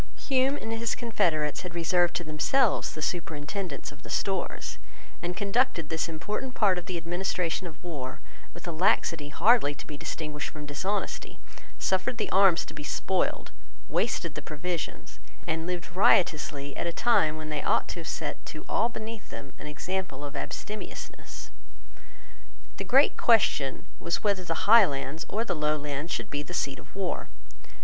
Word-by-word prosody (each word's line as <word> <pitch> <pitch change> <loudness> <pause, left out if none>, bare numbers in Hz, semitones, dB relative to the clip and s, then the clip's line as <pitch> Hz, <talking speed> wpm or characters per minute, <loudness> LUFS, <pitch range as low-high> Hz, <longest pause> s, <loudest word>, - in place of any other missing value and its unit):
Hume 270 +1 +2
and 225 - -5
his 225 0 0
confederates 165 - +1
had 180 -2 -6
reserved 175 +1 +3
to 175 - -1
themselves 185 - +2
the 155 - -4
superintendence 160 0 -3
of 145 - -15
the - - -11
Stores, 195 -2 -1 0.4
and 175 +1 -3
conducted 200 - +1
this 160 +1 -1
important 210 +10 -3
part 195 -4 +4
of 175 - -11
the 185 -2 -2
administration 175 +1 -1
of 160 - -10
war 140 -7 -5 0.3
with 175 - -10
a - - -1
laxity 160 -3 +2
hardly 200 -3 +4
to - - -9
be 150 - -7
distinguished 150 -1 -3
from 150 -1 -8
dishonesty, 190 +8 -2 0.4
suffered 190 +6 +1
the 220 - -1
arms 190 -3 +6
to - - -9
be 150 -1 -7
spoiled, 185 +4 0 0.4
wasted 170 -8 0
the 155 - -5
provisions, 165 +3 -4 0.3
and 160 +1 -1
lived 180 -1 -4
riotously 150 -6 +3
at - - -2
a - - 0
time 160 -6 +3
when 155 0 -6
they 150 -1 -1
ought - - +2
to - - -4
have 165 - -7
set - - -3
to 155 - -8
all 230 +3 +2
beneath 220 -2 -7
them 135 - -8
an - - -7
example 180 +1 -3
of 145 - -7
abstemiousness. 210 0 -6 1.3
The - - -2
great 270 +3 +5
question 170 - +3
was 170 - -1
whether 200 -3 +2
the 165 -2 -2
Highlands 160 - +5
or 225 +3 0
the - - 0
Lowlands 150 0 -1
should - - -2
be 145 - -1
the 175 +5 -6
seat 135 -5 0
of 145 - -15
war. 195 -2 -2
170 Hz, 165 wpm, -28 LUFS, 150-200 Hz, 1.3 s, arms